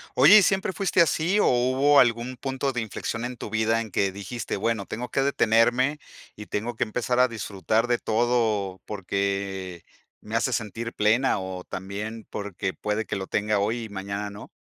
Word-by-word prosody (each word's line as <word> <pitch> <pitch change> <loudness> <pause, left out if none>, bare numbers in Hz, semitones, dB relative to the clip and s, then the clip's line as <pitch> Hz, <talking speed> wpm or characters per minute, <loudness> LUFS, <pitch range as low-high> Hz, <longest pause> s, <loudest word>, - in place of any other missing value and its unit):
Oye, 150 +12 +8
¿y - - +4
siempre 190 +1 +1
fuiste 190 -2 +2
así 170 +4 +2
o - - +4
hubo 130 +4 +4
algún 120 +1 +2
punto 135 +1 -2
de 120 - -1
inflexión 115 +2 -4
en 125 0 -6
tu - - -6
vida 110 +1 +2
en 110 -2 -5
que 95 +1 +1
dijiste: 100 +4 -5
"Bueno, 110 0 -1
tengo 120 +3 -5
que 135 - 0
detenerme 130 +2 +2 0.4
y 105 - -10
tengo 115 +3 -3
que - - +1
empezar 125 +2 -1
a 125 - +6
disfrutar 110 0 -1
de 120 -1 +1
todo 110 -5 0
porque 100 -2 -3 0.4
me 110 +1 -6
hace 115 +3 +1
sentir 115 +1 -3
plena 110 +3 +2
o 95 -1 -6
también 105 +5 -6
porque 100 -2 -4
puede 105 +1 -2
que - - -3
lo 95 -1 -5
tenga 105 0 0
hoy 110 +4 -1
y 110 - -8
mañana 100 +1 -4
no"? 100 - -11
110 Hz, 185 wpm, -25 LUFS, 100-125 Hz, 0.4 s, Oye